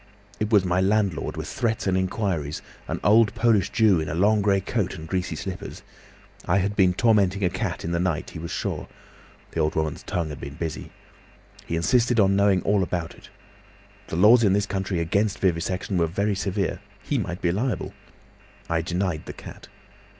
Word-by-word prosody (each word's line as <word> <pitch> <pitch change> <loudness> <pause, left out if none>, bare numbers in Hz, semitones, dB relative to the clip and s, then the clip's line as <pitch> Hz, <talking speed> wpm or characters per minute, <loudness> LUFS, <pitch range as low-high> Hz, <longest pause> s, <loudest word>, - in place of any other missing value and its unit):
It 105 - -1
was 100 -4 +5
my 90 +1 +1
landlord 100 -5 0
with - - -4
threats 115 -2 -1
and 95 -2 +1
inquiries, 95 -5 -2 0.2
an - - -3
old 110 +2 +5
Polish 110 -5 +3
Jew 105 -6 +4
in 80 - -3
a 80 - -3
long 105 +4 +3
grey 100 -1 +3
coat 100 0 -2
and 80 0 -8
greasy 90 +1 -2
slippers. 100 +1 -7 0.6
I 95 - +3
had 100 +2 0
been 95 -3 +3
tormenting 100 -3 +3
a 90 - +2
cat 95 -2 -3
in 85 - -2
the 85 - 0
night, 85 -3 -1
he - - -7
was 85 +1 -6
sure—the - - -7
old 75 - +1
woman's 80 -2 -1
tongue 85 -3 -3
had 75 - -8
been 70 +1 -7
busy. 80 -1 -5 0.8
He 85 - -2
insisted 120 +7 +2
on 100 -1 +4
knowing 100 -2 +3
all 100 0 +2
about 85 -2 -2
it. - - -16 0.8
The - - -5
laws 110 +7 +6
in 100 -3 +4
this 100 0 +2
country 95 -2 -2
against 100 +5 0
vivisection 90 +1 -1
were 85 - +2
very 100 +5 0
severe—he 95 -1 -3
might 90 +3 -4
be 85 - +3
liable. 105 +2 -2 0.7
I 85 -1 0
denied 85 -1 -2
the - - -6
cat. - - -11
95 Hz, 185 wpm, -24 LUFS, 85-105 Hz, 0.8 s, laws